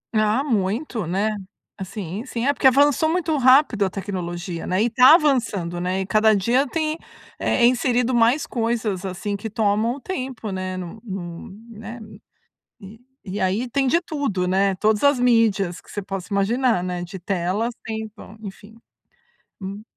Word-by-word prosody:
Ah, 215 +4 +2
muito, 220 - -1
né. 200 +5 0 0.4
Assim 195 +1 -6
sim, 240 0 -3
é 285 - +3
porque 265 - +3
avançou 290 +4 +4
muito 330 -2 0
rápido 255 -4 +5
a 190 - +1
tecnologia, 175 -3 -5
né. 185 +3 +1
E 235 - +1
tá 255 +6 +8
avançando, 220 - 0
né. 185 +1 -1
E - - -3
cada 215 +3 +4
dia 240 +8 +2
tem, 315 +2 -2 0.4
eh, 235 - +2
inserido 250 0 +2
mais 240 +5 +3
coisas 225 -5 -2
assim 190 +2 -3
que 205 +3 -5
tomam 215 +3 +1
o - - -10
tempo, 255 - -5
né. 185 0 -4
Nu 185 +4 -8
nu 175 -5 -7 0.2
né, 225 +2 -9
n 215 -1 -13 0.6
e 205 +3 -12 0.2
e 200 0 -5
aí 205 +7 0
tem 270 +1 +1
de 335 +7 +3
tudo, 275 - -2
né. 195 +1 +2
Todas 215 +4 +1
as 285 -2 +5
mídias 215 -7 +2
que - - -21
você 205 - -5
possa 195 -1 -6
imaginar, 225 0 +1
né, 180 -1 -3
de 175 +2 -7
tela 185 +4 -1 0.2
Se 220 -1 -4
tão, 215 -1 -13
enfim. 205 +2 -10 0.9
Hum. 200 +2 -6
215 Hz, 170 wpm, -22 LUFS, 190-245 Hz, 0.9 s, tá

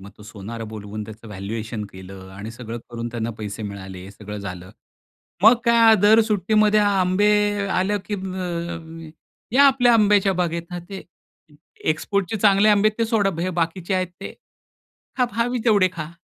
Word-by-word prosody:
मग 100 +1 -12
तो - - -13
सोनार 110 +1 -8
बोलवून 105 -1 -7
त्याचं 110 +1 -12
व्हॅल्युएशन 105 +2 -5
केलं 95 0 -11
आणि 105 +3 -7
सगळं 115 0 -7
करून 120 0 -5
त्यांना 115 -1 -4
पैसे 105 +1 -6
मिळाले 95 -3 -7
हे 95 - -10
सगळं 105 +1 -9
झालं. 90 -2 -8 0.7
मग 220 +4 +8
काय 230 -1 +6
दर 215 +2 +6
सुट्टीमध्ये 215 +1 +3
आंबे 200 0 +2 0.4
आलं, 190 +3 0
की 210 - -4
या - - -4
म 185 -1 -5
अ, 170 -2 -5
अ, - - -12 0.4
ये 255 - +1
आपल्या 260 -4 +5
आंब्याच्या 205 -3 +4
बागेत 170 -2 -1
ना 175 - -5
ते 195 -1 -7 0.9
एक्सपोर्टचे 200 +5 -1
चांगले 200 0 +4
आंबे 210 0 +5
आहेत 215 - -9
ते 230 - +2
सोडा 205 -4 +2
हे 185 - -1
बाकीचे 170 +3 -1
आहेत 185 0 0
ते. - - -7 0.9
हा 250 - +4
पहावी 240 +1 -1
तेवढे 205 -5 +4
खा. 155 -2 -6
175 Hz, 175 wpm, -22 LUFS, -, 0.9 s, मग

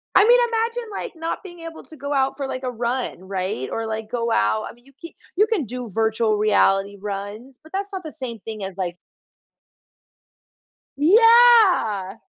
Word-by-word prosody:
I 400 - +7
mean, 485 +2 +6
imagine, 460 0 -2
like, 395 - -6
not 325 0 -4
being 350 -3 -11
able 330 -1 -9
to 315 - -14
go 285 +1 -4
out 270 -1 0
for, 275 -2 -3
like, 255 0 -5
a 255 - -2
run, 240 -4 -3
right? 185 -9 -3
Or, 225 - -3
like, 220 0 -5
go 235 -1 -2
out 105 - +1
I - - -11
mean, 240 +1 -25
you 275 - -20
c 335 - -11 0.2
you 420 +4 +3
can 415 - -1
do 245 0 -6
virtual 220 +1 +1
reality 200 -1 +2
runs, 205 +6 -7
but 315 - -17
that's 395 +1 -4
not 375 -1 -5
the 310 - -7
same 240 -5 -7
thing 215 0 -7
as, 190 -1 -6
like 175 -2 -3 2.0
Yeah! 390 - +5
250 Hz, 185 wpm, -22 LUFS, 210-345 Hz, 2.0 s, I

